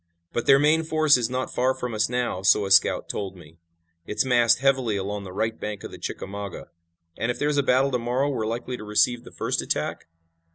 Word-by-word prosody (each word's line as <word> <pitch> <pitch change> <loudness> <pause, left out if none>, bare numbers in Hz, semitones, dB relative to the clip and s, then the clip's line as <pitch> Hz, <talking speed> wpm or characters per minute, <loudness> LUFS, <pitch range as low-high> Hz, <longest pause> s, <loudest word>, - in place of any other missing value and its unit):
But 120 - -2
their 135 - +7
main 155 +3 +3
force 155 -2 +3
is 120 -2 0
not 130 +1 -3
far 130 +1 +1
from 125 -2 -5
us 110 +1 +1
now, 125 -6 -2
so 100 +2 +4
a 95 - -5
scout 100 - +4
told 95 -2 -4
me. 80 -1 -16 0.5
It's 105 - 0
massed 120 -2 +4
heavily 130 -5 +1
along 100 +1 -4
the 95 - -8
right 110 +4 -2
bank 105 -1 -5
of - - -7
the - - -10
Chickamauga." 100 0 -6 0.5
"And 115 - -1
if 120 - -1
there's 145 +2 0
a - - +5
battle 135 +1 +2
to 125 - 0
morrow 125 +4 0
we're 110 -5 -2
likely 120 +2 -4
to 105 - -9
receive 115 +3 +1
the - - -13
first - - -2
attack?" - - -3
120 Hz, 220 wpm, -24 LUFS, 105-130 Hz, 0.5 s, their